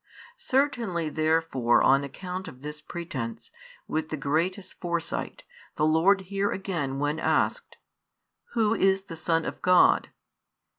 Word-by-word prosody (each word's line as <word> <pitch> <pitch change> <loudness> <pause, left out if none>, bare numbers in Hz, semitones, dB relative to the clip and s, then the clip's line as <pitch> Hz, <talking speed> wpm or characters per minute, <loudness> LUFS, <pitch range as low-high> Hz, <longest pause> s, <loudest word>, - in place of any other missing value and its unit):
Certainly 235 - 0
therefore 155 -6 +2
on 135 +1 +5
account 180 +6 -6
of 135 -4 -11
this 150 0 -7
pretence, 145 -9 -6 0.4
with 155 0 -2
the 155 - -3
greatest 170 +8 -2
foresight, 170 -3 -3 0.3
the 150 - +1
Lord 170 +6 +4
here 195 +2 -1
again 165 -9 -3
when 145 +2 -1
asked, - - 0 0.8
"Who 225 -2 +2
is 195 -2 +2
the 170 -4 -9
Son 165 0 0
of - - -5
God?" 180 0 +5
165 Hz, 130 wpm, -27 LUFS, 150-190 Hz, 0.8 s, on